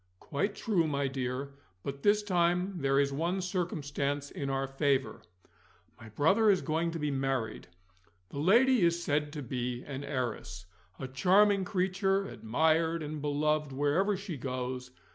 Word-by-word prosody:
"Quite 200 +8 -2
true, 180 -8 +1
my 140 -2 0
dear. 135 +1 -3 0.3
But, 140 0 -5
this 210 +3 +3
time, 180 0 +1
there 135 -1 +2
is 140 -1 +1
one 170 +6 -1
circumstance 145 -6 -2
in 140 -1 -4
our 135 0 0
favour 135 0 0 0.8
my 110 -2 -11
brother 195 - +3
is 195 -3 +3
going 165 +1 0
to 165 - -4
be 150 -2 -1
married. 135 -5 -2 0.6
The 140 - -6
lady 235 - +5
is 170 0 +2
said 150 -1 0
to 150 -2 -5
be 125 0 -3
an 140 -1 -6
heiress; 125 -9 -4 0.3
a 130 - -5
charming 190 +8 +4
creature, 195 +1 0
admired 160 - +1
and 150 0 -5
beloved 150 0 0
wherever 150 +9 +1
she 190 -5 -6
goes. 125 0 -4
150 Hz, 150 wpm, -31 LUFS, 135-180 Hz, 0.8 s, lady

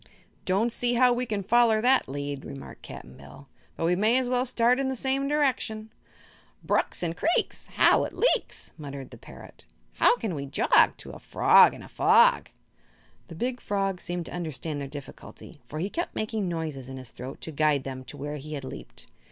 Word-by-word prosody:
"Don't 200 +6 +1
see 245 +1 0
how 250 0 +5
we 245 +1 -2
can 210 -3 -2
foller 230 +1 +4
that 255 - +3
lead," 140 0 -5
remarked 135 - -10
Cap'n 65 - -10
Bill; 70 0 -14 0.3
"but - - -2
we 175 +2 +3
may 215 +6 +3
as 260 -1 0
well 250 +1 0
start 245 +1 +2
in 270 -1 0
the 265 - -2
same 270 +2 0
direction." 255 -7 -1 0.7
"Brooks - - 0
and 165 -1 -2
creeks, 330 - 0
How - - +5
it - - -6
leaks!" - - 0
muttered 140 -3 -8
the 120 - -12
parrot; - - -14 0.3
"How - - +5
can 220 -6 -3
we 140 -2 -5
jog 135 - +3
To - - -10
a - - -10
frog - - +5
in - - -11
a - - -11
fog?" - - +4 0.8
The 165 - -10
big 245 +7 -3
frog 195 -2 -2
seemed 175 -1 -4
to - - -9
understand 160 -3 -4
their 140 - -5
difficulty, 145 +2 -11
for 150 - -7
he 190 +6 -3
kept 345 - -4
making 215 -2 -2
noises 155 -6 -4
in 130 - -7
his 130 -2 -9
throat 130 +3 -8
to 160 - -6
guide 150 -2 +1
them 130 -1 -6
to - - -9
where 145 +1 -5
he 150 +2 -8
had 140 - -6
leaped. 130 - -9
180 Hz, 200 wpm, -27 LUFS, -, 0.8 s, how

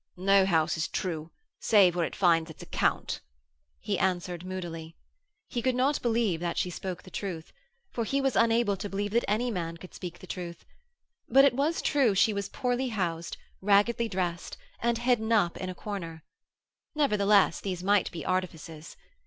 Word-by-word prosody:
'No 195 +1 +4
house 160 -4 +2
is 160 - -1
true 165 -3 -3 0.3
save 195 -5 +5
where 170 -2 +1
it - - -9
finds 165 -3 +3
its 160 - -10
account,' - - -1 0.6
he - - -2
answered 180 -2 -1
moodily. 170 -3 -6 0.5
He 240 - -3
could 255 +1 +1
not 270 +3 +1
believe 225 -7 +1
that 170 0 -3
she 180 - 0
spoke 180 +1 -6
the 185 - -14
truth 175 -6 -5 0.4
for 235 - -2
he 275 +5 0
was 270 -2 0
unable 230 -2 +3
to 205 - -5
believe 205 +1 -2
that 235 +2 +2
any 235 +4 +1
man 170 -4 -4
could 180 +2 -12
speak 175 -2 -7
the - - -12
truth 175 -2 -7 0.6
but 270 +3 +7
it 280 - +4
was 290 +6 0
true 265 -9 +3
she 215 +3 +4
was 200 -1 -3
poorly 250 +1 -1
housed, 170 -7 -3 0.2
raggedly 210 +4 +3
dressed 180 -3 -3 0.2
and 235 0 +1
hidden 235 -2 +1
up 200 -7 +3
in 185 - -4
a 185 - -6
corner. 170 -6 -6 0.7
Nevertheless, 210 - +3
these 180 -3 -4
might 200 0 +3
be 165 -4 -7
artifices. 165 -4 -4
195 Hz, 175 wpm, -28 LUFS, 175-230 Hz, 0.7 s, but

